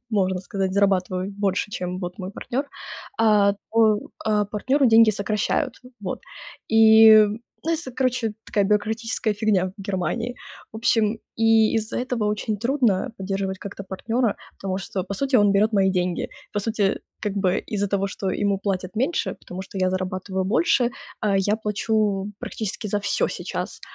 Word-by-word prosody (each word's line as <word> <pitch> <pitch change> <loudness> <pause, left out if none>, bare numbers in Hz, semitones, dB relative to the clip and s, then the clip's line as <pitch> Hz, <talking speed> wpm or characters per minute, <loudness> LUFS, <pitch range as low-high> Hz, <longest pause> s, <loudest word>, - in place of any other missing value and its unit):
можно 190 -4 +1
сказать, 190 0 -2
зарабатываю 190 -1 +1
больше, 200 0 -1
чем 180 -1 -3
вот 180 -1 -6
мой 185 -1 -5
партнер, 265 +7 -4 0.5
а, 210 -2 +4 0.2
то, 220 -2 +4 0.3
а, 210 -1 +2
партнеру 255 +7 +1
деньги 225 -1 +7
сокращают. 210 +3 -1 0.3
Вот 190 -3 -4 0.5
и 220 -1 +8 0.4
это 330 -4 -1
короче 250 -4 0
такая 205 - +1
бюрократическая 215 +2 0
фигня 200 -3 +1
в 200 - -9
Германии. 205 +6 -2 0.4
В - - -7
общем, 225 -1 +2 0.2
и 225 -1 +4
из-за 220 0 -1
этого 245 -3 -2
очень 210 +1 -1
трудно 235 -3 +1
поддерживать 195 0 -3
как-то 200 0 -7
партнера, 225 +4 -1 0.2
потому 190 -1 -4
что 190 -1 -4
по 200 - -5
сути 275 +5 -2
он 205 -3 +5
берёт 210 +3 +3
мои 195 -2 +3
деньги, 180 -1 -1 0.2
по 205 - -1
сути 205 -2 0 0.2
как 210 - -2
бы 190 -2 +2
из-за 205 -2 -2
того, 195 0 0
что 195 -1 -3
ему 200 -1 0
платят 190 -1 -3
меньше, 270 +9 0
потому 180 +1 -7
что 195 - -11
я 185 0 +2
зарабатываю 185 0 -2
больше, 240 - +2 0.3
а, 205 -2 +1
я 205 +2 +2
плачу 210 -2 0
практически 215 0 -4
за 205 0 -1
всё 205 - 0
сейчас. - - -5
205 Hz, 160 wpm, -23 LUFS, 195-225 Hz, 0.5 s, и